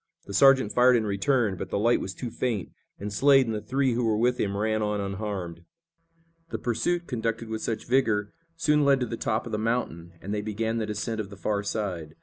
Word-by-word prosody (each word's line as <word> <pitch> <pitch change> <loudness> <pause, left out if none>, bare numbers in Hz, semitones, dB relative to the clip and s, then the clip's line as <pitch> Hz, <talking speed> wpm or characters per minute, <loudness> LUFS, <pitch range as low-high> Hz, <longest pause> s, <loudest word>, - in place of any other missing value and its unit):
The 100 - -8
sergeant 130 -1 +5
fired 125 0 +5
in 115 -2 +1
return, 105 0 +1
but - - -5
the - - -1
light 115 +4 +3
was 95 - -5
too 120 -3 -5
faint, 115 -8 -2 0.3
and 105 +1 -5
Slade 135 +4 +5
and 115 - -2
the 105 - -3
three 130 +1 0
who 120 +1 0
were 110 -2 +2
with 125 +2 +1
him 100 -1 -1
ran 110 +1 0
on 105 -1 -1
unharmed. 100 -4 -4 0.9
The - - -3
pursuit, 170 +9 -1
conducted 115 -4 -3
with 110 0 -4
such 115 - -3
vigor, 110 -5 +1 0.2
soon 150 -3 +2
led 140 -1 +4
to - - +1
the 115 - -4
top 110 0 -1
of 115 - -7
the 105 - -1
mountain, 110 -7 -2
and 100 +5 -5
they 105 - -1
began 110 +2 -2
the 110 - -2
descent 105 +2 -3
of 100 - -8
the 100 - -11
far 100 +1 -1
side. 95 -7 -4
110 Hz, 225 wpm, -27 LUFS, 100-125 Hz, 0.9 s, sergeant